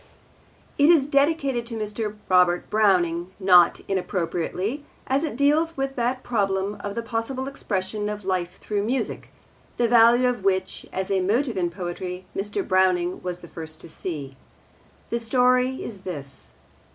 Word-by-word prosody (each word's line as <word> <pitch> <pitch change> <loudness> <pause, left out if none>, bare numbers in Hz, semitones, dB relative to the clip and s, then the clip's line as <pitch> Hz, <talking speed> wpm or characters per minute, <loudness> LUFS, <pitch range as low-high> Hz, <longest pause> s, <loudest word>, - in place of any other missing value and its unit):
It 285 +2 +6
is 320 -6 +6
dedicated 280 -3 +1
to 230 -1 -5
Mr. 215 0 -3
Robert 180 -1 +3
Browning, 180 -5 +2
not 180 -3 +5
inappropriately, 190 - -2 0.2
as 270 +3 +1
it 310 - -2
deals 300 +4 +2
with 270 0 -2
that 250 +1 -1
problem 200 -3 -1
of 200 0 -5
the 230 - -2
possible 235 +4 -3
expression 210 -5 -3
of 210 -2 -6
life 180 -2 -2
through 205 -1 -2
music, 250 +5 -2 0.5
the 240 - +3
value 240 +2 +6
of 245 -5 -2
which 190 -1 -1
as 190 +1 -3
a 190 -1 +2
motive 230 +6 +1
in 175 -2 0
poetry 180 +1 -5
Mr. 200 0 -3
Browning 185 -1 +2
was 180 -1 -4
the - - -11
first 160 -1 -7
to - - -11
see. 145 -6 -5 0.8
The 235 - 0
story 250 +2 +2
is 205 -4 -7
this. 145 -8 -7
205 Hz, 150 wpm, -24 LUFS, 185-250 Hz, 0.8 s, It